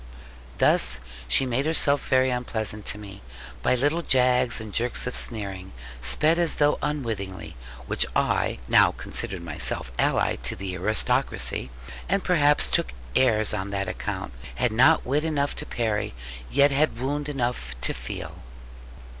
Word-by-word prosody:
Thus 65 Hz, -, +3 dB, 0.3 s
she 130 Hz, -, +2 dB
made 130 Hz, +4 st, 0 dB
herself 145 Hz, -3 st, +3 dB
very 130 Hz, 0 st, +3 dB
unpleasant 110 Hz, -4 st, -3 dB
to 100 Hz, -, 0 dB
me; 100 Hz, -2 st, -10 dB, 0.4 s
by 125 Hz, -, +3 dB
little 145 Hz, +7 st, +1 dB
jags 125 Hz, -4 st, +2 dB
and 110 Hz, -2 st, -8 dB
jerks 120 Hz, +4 st, 0 dB
of 125 Hz, -, -3 dB
sneering, 95 Hz, -4 st, -5 dB, 0.3 s
sped 150 Hz, -, +3 dB
as 170 Hz, -2 st, +1 dB
though 145 Hz, 0 st, +2 dB
unwittingly; 110 Hz, -, -4 dB, 0.3 s
which -, -, +1 dB
I -, -, +1 dB
(who -, -, -13 dB
now -, -, +6 dB
considered 90 Hz, -3 st, -4 dB
myself 75 Hz, -6 st, -1 dB
allied -, -, +1 dB
to -, -, -1 dB
the 95 Hz, 0 st, -5 dB
aristocracy, 90 Hz, -, 0 dB, 0.4 s
and 195 Hz, -, +1 dB
perhaps 150 Hz, -5 st, +4 dB
took 60 Hz, -, 0 dB, 0.2 s
airs 110 Hz, -5 st, +3 dB
on 100 Hz, -1 st, -3 dB
that 100 Hz, -1 st, -2 dB
account) -, -, -4 dB, 0.2 s
had 125 Hz, -2 st, +1 dB
not 120 Hz, +4 st, +4 dB
wit 145 Hz, +4 st, +1 dB
enough 145 Hz, -3 st, -1 dB
to -, -, -3 dB
parry, 105 Hz, -, -2 dB, 0.3 s
yet 140 Hz, -, +4 dB
had 140 Hz, -3 st, +1 dB
wound 145 Hz, +3 st, -2 dB
enough 120 Hz, -, -3 dB
to -, -, 0 dB
feel. -, -, -7 dB
120 Hz, 150 wpm, -25 LUFS, 100-140 Hz, 0.4 s, now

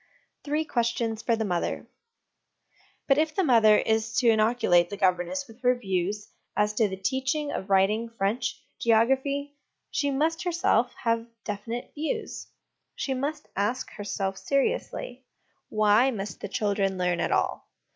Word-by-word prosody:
Three 305 Hz, +2 st, -1 dB
Questions 235 Hz, -4 st, -1 dB
for 230 Hz, -, +1 dB
the 220 Hz, -1 st, -2 dB
Mother. 175 Hz, -3 st, -2 dB, 1.2 s
But 275 Hz, +1 st, +4 dB
if 310 Hz, 0 st, 0 dB
the 385 Hz, -, +2 dB
mother 225 Hz, -7 st, +6 dB
is 220 Hz, 0 st, 0 dB
to 240 Hz, -2 st, +5 dB
inoculate 215 Hz, -6 st, +3 dB
the 205 Hz, -, -6 dB
governess 185 Hz, +8 st, 0 dB
with 225 Hz, +1 st, -16 dB
her 250 Hz, 0 st, +4 dB
views 200 Hz, -2 st, -2 dB, 0.3 s
as 210 Hz, 0 st, +2 dB
to 215 Hz, 0 st, +2 dB
the 190 Hz, -, -5 dB
teaching 265 Hz, +8 st, -1 dB
of 190 Hz, -, -5 dB
writing, 205 Hz, +4 st, +3 dB
French, 230 Hz, +2 st, -2 dB, 0.2 s
geography, 270 Hz, +5 st, +2 dB, 0.4 s
she 285 Hz, -, 0 dB
must, 315 Hz, +4 st, 0 dB
herself, 340 Hz, -9 st, +2 dB
have 230 Hz, 0 st, +1 dB, 0.2 s
definite 225 Hz, +4 st, -5 dB
views. 375 Hz, +10 st, -4 dB, 0.5 s
She 270 Hz, -, -2 dB
must 290 Hz, +4 st, -3 dB
ask 210 Hz, +6 st, -1 dB
herself 195 Hz, -2 st, -3 dB
seriously, 275 Hz, -, -2 dB, 0.4 s
Why 215 Hz, +4 st, +4 dB
must 200 Hz, -7 st, -5 dB
the -, -, -4 dB
children 200 Hz, -2 st, 0 dB
learn 180 Hz, -1 st, 0 dB
at -, -, 0 dB
all? -, -, 0 dB
230 Hz, 145 wpm, -27 LUFS, 205-270 Hz, 1.2 s, mother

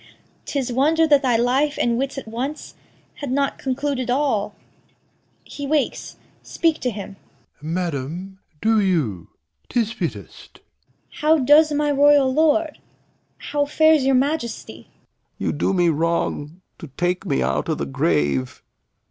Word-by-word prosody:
'Tis 265 Hz, -4 st, -2 dB
wonder 315 Hz, +6 st, +3 dB
that 290 Hz, -3 st, +4 dB
thy 245 Hz, -4 st, +2 dB
life 265 Hz, +5 st, +1 dB
and 235 Hz, -1 st, +1 dB
wits 270 Hz, +3 st, -2 dB
at 270 Hz, -, -6 dB
once 255 Hz, +7 st, -5 dB, 0.4 s
Had 285 Hz, -3 st, -5 dB
not 275 Hz, +1 st, 0 dB
concluded 265 Hz, -1 st, -2 dB
all. 245 Hz, -6 st, 0 dB, 0.9 s
He 285 Hz, -1 st, -7 dB
wakes. 295 Hz, -1 st, -1 dB, 0.2 s
Speak 325 Hz, -2 st, 0 dB
to 250 Hz, -, -1 dB
him. 200 Hz, -3 st, -8 dB
Doct. -, -, -36 dB
Madam, 170 Hz, +3 st, -4 dB, 0.2 s
do 220 Hz, 0 st, +3 dB
you; 130 Hz, -, -1 dB, 0.4 s
'tis 230 Hz, -2 st, 0 dB
fittest. -, -, -7 dB
Cor. -, -, -19 dB, 0.6 s
How 310 Hz, +2 st, +4 dB
does 300 Hz, +3 st, +5 dB
my 295 Hz, 0 st, +1 dB
royal 285 Hz, -2 st, +4 dB
lord? 315 Hz, +1 st, +2 dB, 0.6 s
How 290 Hz, -1 st, -2 dB
fares 315 Hz, 0 st, +4 dB
your 270 Hz, 0 st, +3 dB
Majesty? 270 Hz, -2 st, -2 dB, 0.5 s
Lear. -, -, -1 dB
You -, -, -5 dB
do 150 Hz, -, 0 dB
me 175 Hz, -2 st, +2 dB
wrong 165 Hz, 0 st, -2 dB, 0.2 s
to 165 Hz, -, -8 dB
take 180 Hz, +1 st, 0 dB
me 65 Hz, -, +1 dB
out 65 Hz, +3 st, -1 dB
o' -, -, +1 dB
th' 70 Hz, -1 st, -5 dB
grave. 70 Hz, -5 st, 0 dB
250 Hz, 145 wpm, -21 LUFS, 180-290 Hz, 0.9 s, does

